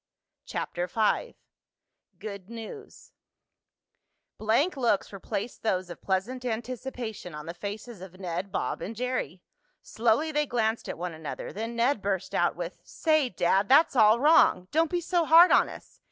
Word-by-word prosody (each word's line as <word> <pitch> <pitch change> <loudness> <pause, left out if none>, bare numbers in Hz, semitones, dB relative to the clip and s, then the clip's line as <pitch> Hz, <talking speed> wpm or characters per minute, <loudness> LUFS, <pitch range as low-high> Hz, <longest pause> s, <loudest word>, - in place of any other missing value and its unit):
CHAPTER 175 +1 -3
V 225 - 0 0.8
GOOD 200 -2 -8
NEWS 235 - -10 1.3
Blank 235 +12 +2
looks 235 -7 0
replaced 200 +3 -5
those 185 -4 -1
of - - -10
pleasant 205 +7 -2
anticipation 235 -5 -5
on 150 - -8
the 170 - -6
faces 205 +2 -7
of 185 0 -11
Ned, 185 +1 -4
Bob - - -2
and 225 - -5
Jerry. 240 - -3 0.4
Slowly 235 +8 +1
they 300 0 0
glanced 230 -2 -1
at - - -4
one 175 0 -4
another, 160 -1 -7
then 225 +3 -4
Ned 235 0 +1
burst 195 -2 -2
out - - +2
with: - - -6
"Say, 310 -5 +1
Dad, 190 +3 +1
that's 285 +2 +5
all 220 -1 +6
wrong! 275 - +5
Don't 320 +1 +2
be 350 -1 -1
so 345 0 +1
hard 330 +3 +7
on - - +5
us. - - -13
225 Hz, 155 wpm, -27 LUFS, 190-260 Hz, 1.3 s, hard